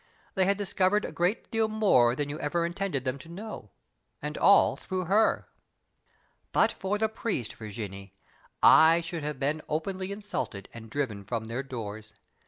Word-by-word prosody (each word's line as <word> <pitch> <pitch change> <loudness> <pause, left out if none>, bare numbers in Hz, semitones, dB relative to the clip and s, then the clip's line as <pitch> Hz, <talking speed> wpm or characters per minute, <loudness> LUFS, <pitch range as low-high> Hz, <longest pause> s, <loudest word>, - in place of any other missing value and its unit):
They 190 -2 +2
had 200 +1 +2
discovered 200 0 +1
a - - -5
great 180 +6 -1
deal 225 -1 +2
more 195 - +3
than 145 +1 -1
you 145 +1 -5
ever 170 +3 0
intended 175 -6 -2
them 130 +1 -2
to 165 - -13
know, 210 +6 -8 0.5
and - - -5
all - - +5
through 185 -2 -4
her." 210 +5 +2 1.0
"But - - +4
for 195 +2 -2
the 220 +1 +2
priest, 215 - -3
Virginie, 100 -3 -7 0.5
I 165 +2 +7
should 170 -1 -5
have 150 -2 -4
been 145 +3 0
openly 185 +5 -2
insulted 200 - -4
and 115 -1 -10
driven 115 -7 -3
from 110 +2 -3
their 115 +3 -3
doors. 110 -5 -7
160 Hz, 165 wpm, -28 LUFS, 120-195 Hz, 1.0 s, I